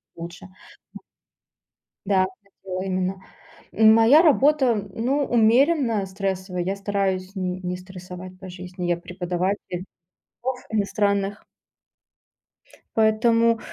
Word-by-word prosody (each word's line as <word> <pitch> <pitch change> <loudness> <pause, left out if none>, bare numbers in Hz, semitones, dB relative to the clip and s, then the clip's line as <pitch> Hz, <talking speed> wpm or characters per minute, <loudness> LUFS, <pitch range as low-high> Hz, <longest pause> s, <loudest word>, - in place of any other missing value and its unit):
лучше, 170 +2 -9 0.5
м. - - -9 1.1
Да, 195 -1 +2
на 200 0 -8
тело 185 -1 -4
именно. 185 0 -2 0.5
Моя 225 +7 +6
работа, 285 -5 +4 0.2
ну, 270 +5 0
умеренно 235 -1 +3
стрессовая. 190 -1 -3
Я 190 +2 -2
стараюсь 195 -1 -2
н 185 -1 -3
не 180 0 -3
стрессовать 185 0 -10
по 190 - -9
жизни. 180 0 -6
Я 175 - +1
преподаватель 180 +2 -3 0.7
языков 255 0 -3
иностранных. 200 -1 0 1.5
Поэтому 230 +1 +3
195 Hz, 100 wpm, -23 LUFS, 185-225 Hz, 1.5 s, Моя